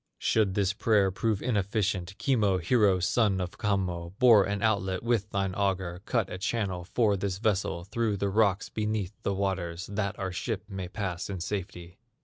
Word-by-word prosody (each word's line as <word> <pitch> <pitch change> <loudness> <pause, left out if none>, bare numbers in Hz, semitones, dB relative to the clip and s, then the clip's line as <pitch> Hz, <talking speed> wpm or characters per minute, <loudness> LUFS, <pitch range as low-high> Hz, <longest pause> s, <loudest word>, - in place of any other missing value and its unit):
"Should 105 -4 +1
this 100 -1 +1
prayer 105 -3 +2
prove 105 +1 -1
inefficient, 100 -4 -1
Kimmo, 110 -5 +2
hero 100 +1 +3
son 100 +1 +2
of 90 +3 -5
Kammo, 95 -5 -1
Bore 115 -6 +7
an 100 0 -2
outlet 95 -4 0
with 115 -3 0
thine 95 -2 -1
auger, 95 -2 -1
Cut 115 -6 0
a 90 - -5
channel 95 -4 -2
for 105 +2 +1
this 95 -1 -2
vessel 100 -4 0
Through 105 +2 -1
the 100 +1 0
rocks 100 -1 +2
beneath 105 -3 -2
the 100 - -1
waters, 95 -3 -2
That 100 -1 -3
our 95 -1 -3
ship 100 +3 -3
may 95 -3 -5
pass 95 -2 -4
in 95 -2 -4
safety! 90 -1 -5
100 Hz, 170 wpm, -28 LUFS, 95-105 Hz, -, Bore